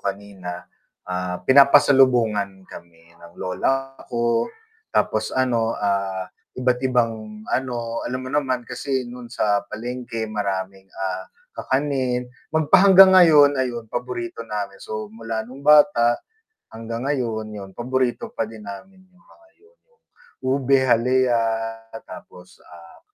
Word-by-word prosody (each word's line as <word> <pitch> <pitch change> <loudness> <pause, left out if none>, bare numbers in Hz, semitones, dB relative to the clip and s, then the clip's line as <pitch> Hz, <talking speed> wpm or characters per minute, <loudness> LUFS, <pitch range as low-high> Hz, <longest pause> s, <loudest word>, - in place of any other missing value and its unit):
kanina, 95 -3 -6 0.5
ah, 90 0 -2
pinapasalubungan 130 -8 +4
kami 85 -1 -13 0.2
ng 85 0 -14
lola 135 +9 -1 0.2
ko 120 -1 0 0.5
tapos 110 0 +1 0.2
ano, 115 -3 0
ah, 100 -2 -1 0.3
iba't 125 -1 +1
ibang, 110 -3 -2
ano, 130 -2 -3 0.3
alam 130 +1 -3
mo 130 - -6
naman 130 -4 0
kasi 130 +1 -3
nun 125 -1 -10
sa 105 -4 +1
palengke 120 0 -5
maraming, 95 -2 -4 0.2
ah, 95 0 -4 0.3
kakanin, 130 -3 -1 0.2
magpahanggang 190 +4 +7
ngayon 155 -5 +7
ayun 120 -2 -4
paborito 120 -1 -4
namin, 100 -2 -5
so 110 -1 -6
mula 115 0 -4
nung 130 +4 -12
bata 150 -6 +5 0.6
hanggang 115 +1 -6
ngayon 115 -6 -2
yun 100 -2 -8
paborito 125 0 -2
pa 115 - -2
din 110 -1 -11
namin 105 - -10
yung 185 - -28
mga 335 - -23
yun, 450 +4 -26
'yung 470 - -36 0.5
ube 135 0 +3
halaya 125 0 +2 0.7
tapos, 90 +1 -13
ah, 85 -1 -16
120 Hz, 120 wpm, -22 LUFS, 105-130 Hz, 0.7 s, magpahanggang